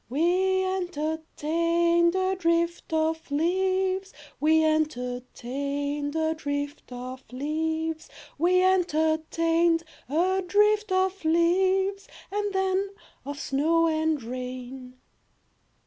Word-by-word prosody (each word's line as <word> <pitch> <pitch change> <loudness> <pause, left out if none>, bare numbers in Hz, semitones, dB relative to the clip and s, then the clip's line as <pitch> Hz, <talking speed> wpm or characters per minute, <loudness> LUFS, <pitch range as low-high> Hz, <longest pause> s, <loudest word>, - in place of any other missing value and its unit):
We 365 +7 +2
entertained 335 0 0
a 375 0 +1
drift 340 -1 0
of 320 0 0
leaves, 375 +5 0 0.3
We 315 +1 +4
entertained 285 0 -2
a 320 0 +1
drift 285 -2 -4
of 255 +1 -7
leaves, 315 +4 -2 0.3
We 365 +3 +4
entertained 330 -1 +2 0.3
a 365 +6 +2
drift 420 +2 +2
of 375 0 +1
leaves, 380 +5 +2 0.2
And 410 0 -1
then 385 0 0 0.4
of 285 0 -5
snow 320 +5 +2
and 315 -3 0
rain. 255 +1 -7
325 Hz, 90 wpm, -26 LUFS, 290-370 Hz, 0.4 s, We